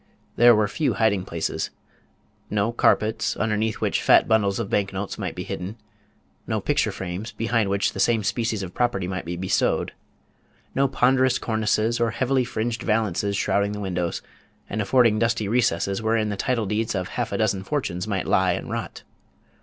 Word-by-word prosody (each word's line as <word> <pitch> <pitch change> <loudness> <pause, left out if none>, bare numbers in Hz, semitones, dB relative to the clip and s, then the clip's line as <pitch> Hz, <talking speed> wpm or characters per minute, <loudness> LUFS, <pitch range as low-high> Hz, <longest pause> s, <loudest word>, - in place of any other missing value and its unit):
There 120 0 +7
were 105 0 +2
few 150 +8 -1
hiding 100 -5 +1
places. 85 -2 -3 0.8
No 105 +2 0
carpets, 110 -2 +1
underneath 110 0 -1
which - - 0
fat - - +5
bundles 100 -3 +2
of 115 - -2
bank 100 -1 0
notes 95 +1 -4
might - - -4
be - - -4
hidden; 95 +5 -5 0.7
no - - 0
picture - - +1
frames, 95 +5 -5
behind 115 -2 0
which 100 +1 0
the - - -6
same 115 -3 +2
species 110 +1 -1
of 90 -1 -7
property 120 -7 0
might 95 -2 -4
be 85 +1 -4
bestowed; 95 +2 0 0.8
no 140 +1 +2
ponderous 130 0 +3
cornices 110 +1 0
or 115 -1 +2
heavily 130 +2 +1
fringed 120 0 -3
valances 105 -3 0
shrouding 100 +1 +1
the 105 - -5
windows, 90 -3 -2 0.4
and 105 - -2
affording 115 0 +3
dusty 115 -2 +1
recesses 100 -4 +1
wherein 110 -1 +1
the 105 - -2
title 115 +2 -1
deeds 105 +2 -1
of 95 -1 -2
half 120 -2 -3
a - - -1
dozen 100 -4 0
fortunes 100 -8 -2
might 100 -3 -1
lie 95 -1 +3
and - - -5
rot. - - -5
110 Hz, 175 wpm, -24 LUFS, 95-115 Hz, 0.8 s, There